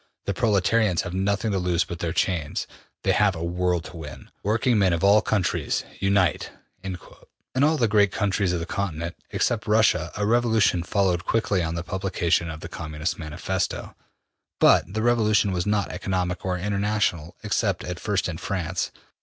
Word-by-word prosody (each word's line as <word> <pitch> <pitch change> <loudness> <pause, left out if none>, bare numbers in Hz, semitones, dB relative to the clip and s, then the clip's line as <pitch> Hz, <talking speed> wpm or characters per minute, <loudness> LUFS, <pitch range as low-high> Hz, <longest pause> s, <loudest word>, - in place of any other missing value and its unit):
The 100 - -1
proletarians 105 -3 +2
have 85 - -6
nothing 100 +3 0
to 95 - 0
lose 90 -1 +1
but 85 - -7
their 85 -1 -2
chains. 80 -5 -1 0.4
They - - +3
have 105 -3 +3
a 80 - -5
world 90 0 0
to 85 - -10
win. 75 -5 -9
Working 110 +3 +2
men 95 -3 +3
of 85 - -1
all 100 +2 +6
countries, 105 -4 0 0.2
unite!'' 100 -4 +2 0.3
In 95 -2 -4 0.7
all 155 +2 +4
the 115 - +3
great 100 -2 +3
countries 100 -3 0
of 90 - -1
the 85 - -4
Continent, 85 -3 -3
except 115 -1 0
Russia, 110 +1 +3
a 105 - 0
revolution 110 -5 +3
followed 90 0 +1
quickly 105 -4 +1
on 80 0 -2
the 85 - -3
publication 90 -3 0
of 80 -1 -7
the - - -6
Communist 75 0 -4
Manifesto, 75 -2 -3 0.6
but 95 - +5
the 110 +2 -2
revolution 110 -4 +3
was 90 0 -2
not 105 -1 0
economic 90 -2 -2
or 90 -1 -1
international, 100 -4 -1
except 100 -3 0
at 90 -1 -5
first 105 -4 0
in 85 -2 -5
France. 90 -4 -2
95 Hz, 170 wpm, -25 LUFS, 85-105 Hz, 0.7 s, all